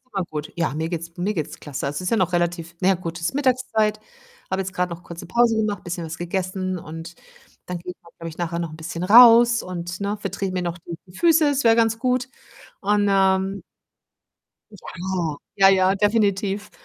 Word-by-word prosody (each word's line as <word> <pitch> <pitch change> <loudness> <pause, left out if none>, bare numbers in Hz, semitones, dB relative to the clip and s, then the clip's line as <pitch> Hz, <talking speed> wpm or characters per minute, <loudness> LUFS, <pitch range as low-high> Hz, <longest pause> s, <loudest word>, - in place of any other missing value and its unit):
ist 260 - -48
immer 195 -2 0
gut. 155 -2 -6
Ja, 165 -5 -1
mir 160 +1 -2
geht's 170 0 -6
mir 195 +4 -1
geht's 155 -5 -4
klasse. 140 -2 -5
Also, 140 +1 -3
es - - -2
ist 180 - -2
ja 230 - +2
noch 185 -3 +1
relativ 175 -1 -1
na 185 - +3
ja 195 - +5
gut, 170 -1 -6
ist 170 - -2
Mittagszeit. 250 -6 +1 0.5
Habe 190 0 0
jetzt 190 0 -7
grade 180 0 -1
noch 170 +1 -8
kurze 170 -1 -9
Pause 235 +4 +3
gemacht, 210 -3 -1
bisschen 175 -1 -4
was 160 0 -7
gegessen 185 +1 -3
und 165 +1 -9 0.5
dann 180 -1 -4
gehe 180 +1 -7
ich, - - -27 0.2
glaube 165 - -6
ich, 160 - -11
nachher 170 -1 -2
noch 170 -2 -3
'n 155 - -9
bisschen 165 +1 -6
raus 235 +3 +8
und, 175 0 -6
ne, 200 +1 -1
vertrete 195 -1 -3
mir 185 - -1
noch 175 0 -3 0.3
die 180 - -17
Füße, 330 -2 +4
das 280 -2 0
wäre 230 0 +5
ganz 225 -1 +2
gut. 255 +1 0 0.5
Und, 205 +1 +2
ähm 195 0 +2 1.1
Ja. 205 - -14 0.8
Ja, 195 -1 +6
ja, 190 0 +4
definitiv 205 -1 0
185 Hz, 205 wpm, -23 LUFS, 170-210 Hz, 1.1 s, raus